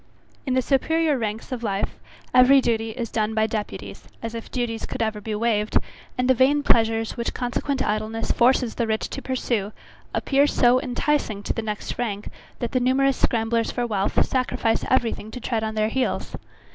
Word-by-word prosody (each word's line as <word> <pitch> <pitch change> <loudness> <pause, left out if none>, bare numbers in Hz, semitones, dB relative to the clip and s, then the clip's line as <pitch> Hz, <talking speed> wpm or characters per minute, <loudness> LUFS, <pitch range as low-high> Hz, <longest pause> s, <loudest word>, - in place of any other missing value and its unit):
In 255 - +1
the 255 - +2
superiour 315 +3 +2
ranks 220 0 -4
of 250 -2 -3
life, 200 -3 -2 0.3
every 255 +2 +7
duty 225 -3 0
is 230 0 -5
done 220 0 0
by 220 0 +3
deputies, 215 -1 -5 0.2
as 230 0 -4
if 230 -1 -7
duties 235 -3 -3
could - - -5
ever 215 -1 -2
be 215 0 -3
waved, 215 -1 +1 0.4
and 250 0 +1
the 260 - +6
vain 275 +4 +3
pleasures 225 -3 +2
which 235 - -3
consequent 260 +2 -1
idleness 215 +2 -1
forces 245 -1 +3
the 235 - -1
rich 220 0 -1
to 275 - -5
pursue, 235 -6 -2 0.4
appear 280 +1 +3
so 250 -2 +4
enticing 250 -5 -1
to - - -1
the - - -3
next 210 +1 -5
rank, 210 -4 -3 0.3
that 240 - -3
the 255 - +2
numerous 265 +2 +2
scramblers 230 0 +1
for 245 - -1
wealth 205 -4 +1
sacrifice 250 -3 0
every 245 -3 +3
thing 215 - -7
to 250 - -7
tread 230 -2 -1
on 220 0 -3
their 215 0 +1
heels. 260 +3 -1
235 Hz, 185 wpm, -24 LUFS, 220-255 Hz, 0.4 s, every